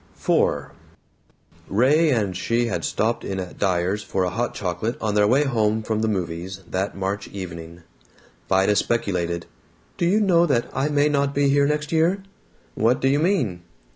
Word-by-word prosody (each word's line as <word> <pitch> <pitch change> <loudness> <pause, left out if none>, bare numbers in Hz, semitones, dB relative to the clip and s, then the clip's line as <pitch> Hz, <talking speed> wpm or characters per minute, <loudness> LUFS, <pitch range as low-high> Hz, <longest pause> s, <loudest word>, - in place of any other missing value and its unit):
IV - - +1 1.0
Ray 140 +10 +3
and 105 -8 0
she 115 +6 0
had 115 - -2
stopped 115 +2 -1
in 95 -1 -3
at 90 -1 -7
Dyer's 95 +1 0
for 95 -2 -2
a 90 - -1
hot 120 +5 -2
chocolate 95 +5 -3
on 110 -2 -1
their 105 0 +4
way 130 +6 +4
home 110 -5 0
from 110 0 -1
the 110 - +1
movies, 95 -1 -3
that 95 +2 -3
March 100 +1 -3
evening. 85 -3 -8 0.7
Vida 95 +2 +3
speculated, 90 -7 -1 0.5
"Do 170 - +1
you 200 +5 +3
know 175 -5 +4
that 120 -6 +1
I 135 +3 0
may 145 0 +3
not 140 -1 0
be 140 0 +3
here 140 0 +3
next 150 0 -2
year?" 170 +4 +2 0.5
"What 115 +4 +2
do 135 - +1
you 140 +2 +3
mean?" 150 - 0
110 Hz, 170 wpm, -23 LUFS, 95-140 Hz, 1.0 s, their